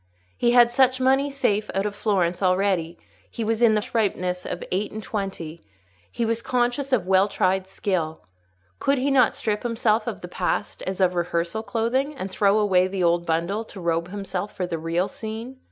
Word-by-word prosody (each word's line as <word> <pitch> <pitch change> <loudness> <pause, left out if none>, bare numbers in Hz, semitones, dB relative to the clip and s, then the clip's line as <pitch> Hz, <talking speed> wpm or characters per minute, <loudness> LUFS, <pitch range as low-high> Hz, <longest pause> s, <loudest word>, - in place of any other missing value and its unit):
He 240 0 +2
had 240 -1 +5
much 260 0 +5
money 270 +2 +3
safe 215 -7 0
out 195 +1 +1
of 210 - -2
Florence 185 -5 0
already; 185 -3 +1 0.3
he 230 - -4
was 225 +1 -1
in 225 -2 +5
the 210 - +1
fresh 225 0 +1
ripeness 180 -1 -4
of - - -4
eight 195 +3 -1
and 215 0 -6
twenty; 190 -7 -5 0.5
he 230 - -1
was 230 +1 0
conscious 245 +3 0
of 230 -8 +2
well 190 +1 +4
tried 190 -1 0
skill. 185 -5 -2 0.6
Could 275 0 +2
he 270 +2 +1
not 255 -4 +4
strip 210 -1 -1
himself 230 -2 +1
of - - -4
the - - -6
past, - - -2
as 190 0 -2
of 180 -1 +3
rehearsal 170 +3 -1
clothing, 235 +7 -1
and 190 -7 -5
throw 200 +2 +3
away 190 -4 +3
the 185 -1 -2
old 170 0 +2
bundle, 170 +7 0
to 200 - -11
robe 170 -1 0
himself 195 0 -5
for 185 - -1
the 165 -2 -4
real 165 +3 0
scene? 225 +4 -7
205 Hz, 195 wpm, -24 LUFS, 180-230 Hz, 0.6 s, had